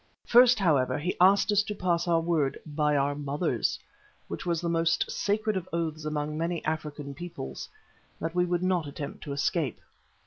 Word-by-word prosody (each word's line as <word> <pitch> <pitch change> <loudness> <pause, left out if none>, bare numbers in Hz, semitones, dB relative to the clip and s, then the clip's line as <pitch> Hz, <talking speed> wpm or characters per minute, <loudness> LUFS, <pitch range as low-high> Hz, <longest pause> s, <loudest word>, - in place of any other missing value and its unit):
First, 245 +1 +6
however, 140 -10 +2
he 165 +5 -2
asked 195 +3 +5
us 205 0 +4
to 210 0 -5
pass 175 -3 0
our 170 -1 +3
word 160 -5 0
"by 150 -1 +1
our 140 +1 +1
mothers," 145 -2 -1 0.5
which - - -6
was 170 -2 +1
the 170 - -3
most 165 -1 +1
sacred 215 +1 0
of 185 -2 -4
oaths 160 -2 -2
among 150 0 -2
many 170 0 -2
African 150 -2 -3
peoples, 140 - -7 0.5
that 165 0 -3
we 180 0 +2
would 175 0 -1
not 180 -4 +1
attempt 145 0 -7
to 145 - -5
escape. 140 -1 -1
165 Hz, 175 wpm, -28 LUFS, 145-180 Hz, 0.5 s, First